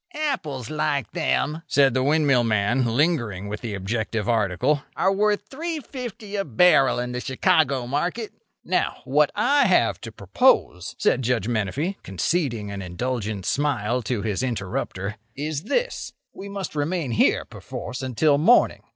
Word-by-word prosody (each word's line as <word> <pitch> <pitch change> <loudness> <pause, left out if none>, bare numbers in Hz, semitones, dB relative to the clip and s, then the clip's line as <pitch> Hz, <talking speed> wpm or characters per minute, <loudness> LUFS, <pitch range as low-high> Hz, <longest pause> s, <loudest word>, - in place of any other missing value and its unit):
"Apples 155 - -3
like 150 -4 -1
them," 145 - 0
said 135 -3 +4
the 130 - +1
windmill 140 -3 +3
man, 115 +3 +1
lingering 115 - 0
with 105 +1 -5
the 110 -4 -4
objective 110 +2 -2
article, 115 +6 +1
"are 190 +1 +2
worth 210 +1 +1
$3.50 260 - -5
a - - +1
barrel 135 - +4
in 125 0 -2
the 125 - -3
Chicago 135 -1 +1
market." 180 - -2 0.3
"Now, - - -1
what 145 +2 +3
I 280 0 +3
have 185 - +2
to - - -7
propose," - - +1
said 130 - +2
Judge 120 -4 0
Menefee, 120 - -1
conceding 115 - -1
an 100 -1 -5
indulgent 105 +1 -3
smile 125 -2 0
to 115 -2 -2
his 105 0 -1
interrupter, 100 -3 -3 0.2
"is 150 +2 -4
this: - - -2 0.2
We 200 - -8
must 200 -3 -5
remain 150 -1 -1
here, 110 - +2
perforce, 125 - -7
until 140 +3 +2
morning. 235 +11 +4
130 Hz, 145 wpm, -24 LUFS, 110-170 Hz, 0.3 s, said